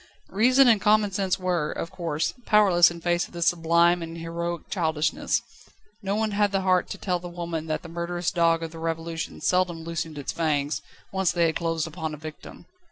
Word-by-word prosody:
Reason 255 +6 +5
and 220 -4 +5
common 210 0 +3
sense 190 0 0
were, 180 -5 -1
of 165 - -5
course, 165 -2 -2
powerless 195 -5 +6
in 170 -1 -9
face 175 0 +1
of - - -21
this 170 -1 -1
sublime 170 +1 +3
and 165 0 -6
heroic 170 +1 -4
childishness. 160 -4 0 0.6
No 200 -1 -1
one 220 0 0
had 205 0 +2
the 195 -1 0
heart 185 -1 +2
to - - -5
tell 180 -2 -1
the 175 - -8
old 175 0 -12
woman 165 -2 -4
that 155 - -2
the - - -8
murderous 170 +1 -2
dog 165 -1 +2
of 165 - -5
the 165 - -10
Revolution 165 0 -4
seldom 180 -3 +1
loosened 165 -2 -4
its 140 - -3
fangs, 150 -3 -1 0.3
once 190 -2 +1
they 175 -1 +2
had 160 - 0
closed 165 -2 -1
upon 160 -1 -5
a - - -13
victim. 155 +1 -10
170 Hz, 205 wpm, -25 LUFS, 165-185 Hz, 0.6 s, powerless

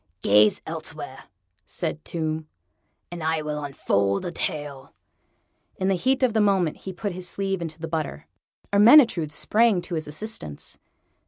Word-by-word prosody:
"Gaze 105 +1 +5
elsewhere," - - -7 0.4
said 155 - -4
Tomb, 160 -1 -3 0.6
"and 175 -2 -6
I 160 -1 0
will 150 -1 -3
unfold 100 -8 0
a 175 - -3
tale." 145 -5 -4 0.8
In 190 0 -1
the - - +3
heat 260 +8 +1
of 250 -4 +3
the 220 - +3
moment 190 -6 +2
he 190 - -7
put 195 +3 -4
his 180 0 -5
sleeve 195 -2 -2
into 160 -2 -5
the 165 0 -5
butter. 155 - -4 0.5
Ermyntrude 210 - +6
sprang 215 +6 +3
to 180 - -7
his 155 -2 -2
assistance. 150 - -5
165 Hz, 150 wpm, -25 LUFS, 150-195 Hz, 0.8 s, Ermyntrude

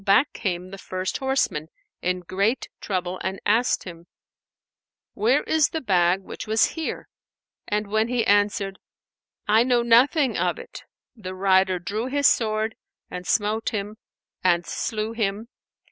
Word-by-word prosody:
back 205 +8 +4
came 180 -3 -3
the 195 - -8
first 185 0 -3
horseman 265 - 0 0.3
in 180 0 -1
great 200 +8 0
trouble 185 -2 -3
and 190 +1 -3
asked 230 +4 +2
him, 170 -1 -10 1.1
"Where 240 +8 +2
is 315 -3 +2
the 320 - -3
bag 185 - +2
which 195 - -8
was 220 +1 +3
here?" 325 -1 -4 0.6
and 210 +1 0
when 220 +2 +1
he 245 -1 0
answered, 205 -1 +1 0.7
"I 215 +2 +5
know 245 -1 +2
nothing 250 +3 +4
of - - 0
it," - - -10 0.3
the 185 -5 -7
rider 190 -1 +3
drew 210 +7 -3
his 285 +2 0
sword 220 -2 +2 0.4
and 180 0 -6
smote 215 +1 +1
him 210 -1 -4 0.5
and 175 -2 +3
slew 215 -1 -3
him. 220 0 -2
210 Hz, 145 wpm, -24 LUFS, 185-230 Hz, 1.1 s, I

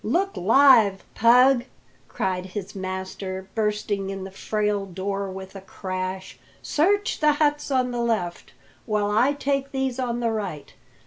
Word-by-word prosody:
"Look 365 - 0
alive, 225 -2 +5
Pug!" 250 +2 +5 0.4
cried 185 0 -2
his 190 +1 -6
master, 190 0 -5
bursting 210 -3 -1
in 195 -1 -5
the 190 - -8
frail 210 0 -1
door 195 +2 -3
with 190 +1 -9
a 195 - -7
crash. 185 0 -5 0.2
"Search 405 +7 +1
the 300 -1 +4
huts 295 0 0
on 255 -2 +1
the 240 -1 -2
left, 215 -7 -2 0.4
while 210 -2 0
I 245 +7 +3
take 275 -1 -2
these 265 -2 -2
on 240 -2 -1
the 230 -1 0
right. 195 -9 -5
210 Hz, 145 wpm, -24 LUFS, 190-260 Hz, 0.4 s, alive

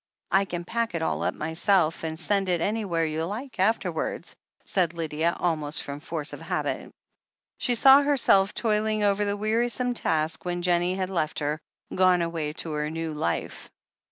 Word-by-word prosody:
"I 195 +1 +4
can 175 -2 -5
pack 230 -1 -2
it 165 - -1
all 75 - -1
up 90 +2 -1
myself 165 +1 +1
and 160 0 -3
send 195 +2 +1
it 175 -1 +2
anywhere 195 -4 0
you 155 +1 -2
like 225 +6 -6
afterwards," 220 +5 -1 0.3
said 175 -3 0
Lydia, 165 +1 -1
almost 155 -3 0
from 140 0 -6
force 155 -1 -3
of - - -8
habit. - - -3 0.7
She 245 - +1
saw 270 +4 +8
herself 250 -9 +3
toiling 215 -1 +1
over 205 0 +2
the 205 0 -1
wearisome 240 +4 +1
task 160 -7 -1
when 175 0 -3
Jennie 175 +1 +2
had 190 0 -3
left 160 -4 -1
her, 150 +1 -1 0.3
gone 185 -2 +4
away 165 -3 -2
to 160 0 -4
her 150 0 -2
new 165 0 -4
life. 115 - -3
175 Hz, 170 wpm, -26 LUFS, 160-205 Hz, 0.7 s, saw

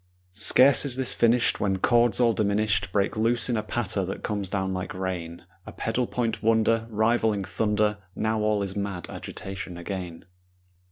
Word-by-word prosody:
Scarce 125 +6 +6
is 140 -4 -1
this 130 -1 0
finished 120 +1 +2
When 95 -2 0
chords 120 +3 +2
all 120 -2 +4
diminished 100 -2 0
Break 100 0 0
loose 115 +2 +1
in 120 - +1
a 110 - 0
patter 105 -2 -2
that 95 - -6
comes 100 -3 -3
down 95 -1 -2
like 90 0 -5
rain, 90 -3 -5 0.2
A - - -7
pedal 115 +2 -2
point 115 -3 -2
wonder 115 0 +2
Rivaling 110 -1 +1
thunder. 105 +1 0 0.2
Now 110 0 -1
all 105 -1 +1
is 95 -1 -4
mad 100 -4 -4
agitation 90 -2 -7
again. 90 -2 -6
105 Hz, 165 wpm, -26 LUFS, 95-115 Hz, 0.2 s, Scarce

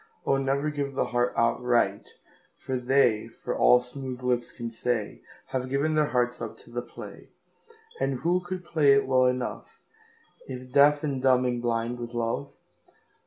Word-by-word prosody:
O 135 - +2
never 135 +2 0
give 140 -2 -3
the - - +1
heart 120 0 0
outright, 120 +1 +1 0.6
For 130 - -2
they, 125 -3 +2
for - - -6
all 125 - +5
smooth 125 0 -5
lips 125 -1 0
can 115 -1 -6
say, 115 -2 -2 0.3
Have 130 -1 -3
given 140 +4 0
their 155 -1 +3
hearts 125 -2 0
up 115 - -6
to - - -16
the 120 0 -3
play. - - -11 0.7
And 135 -2 -1
who 175 +3 +2
could 180 0 -6
play 150 -5 +4
it 140 - +3
well 130 -1 +4
enoughIf 125 -1 -4 1.1
deaf 145 +1 +5
and 140 -4 -2
dumb 130 -1 +4
and 120 -1 -1
blind 120 0 -1
with 120 0 -7
love? 120 +4 -2
130 Hz, 165 wpm, -27 LUFS, 120-140 Hz, 1.1 s, all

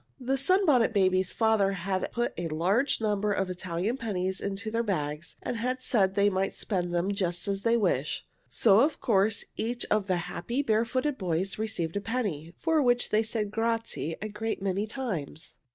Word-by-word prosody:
The 260 +1 0
Sunbonnet 280 - +3
Babies' 185 -2 +2
father 220 -3 +2
had 190 +1 -2
put 240 0 -1
a 175 0 -3 0.5
number 210 -1 +1
of 195 -1 0
big 180 - -3
Italian 185 +6 -2
pennies 190 -5 -2
into 200 +2 -3
their 230 +1 +1
bags, 150 -7 -3
and 240 - -3
had 255 +2 -2
said 195 -6 +2
they 200 0 +4
might 195 -1 0
spend 180 -4 -2
them 175 +3 0
just 180 -1 -2
as 195 -1 -1
they 230 +2 +3
wished, 160 - 0 0.2
so 195 - +5
of 290 +5 +2
course 205 -2 +2
each 240 +2 -2
of 210 -2 +2
the 185 -2 +1
happy, 255 +4 -2
barefooted 255 +5 0
boys 185 +2 -1
received 210 -7 -2
a - - -2
penny, 200 -9 -3
for 320 -2 +2
which 245 -2 +2
they 215 - +4
said 220 -2 -2
grazie 225 -7 -1
a 215 - -3
great 220 +2 -3
many 195 +2 -1
times. 200 - -5
205 Hz, 180 wpm, -28 LUFS, 185-230 Hz, 0.5 s, so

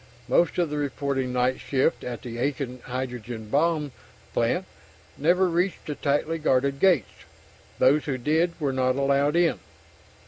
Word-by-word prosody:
Most 170 - +2
of 170 -4 +1
the 150 - -2
reporting 140 -2 -2
night 125 +1 +1
shift 135 +3 0
at 120 -2 -6
the 120 -2 -6
Aiken 130 -1 -2
hydrogen 125 -3 -5
bomb 150 +1 +1 0.4
plant - - +1 0.5
never 180 +6 +3
reached 175 +2 -1
the 150 - -3
tightly 145 +3 -1
guarded 140 -2 +1
gates. 175 - +2 0.5
Those 145 +3 +4
who 135 -3 -2
did 160 +7 0
were 140 -4 0
not 130 -1 +1
allowed 140 +2 +2
in. 170 -1 +2
140 Hz, 145 wpm, -25 LUFS, 130-160 Hz, 0.5 s, Those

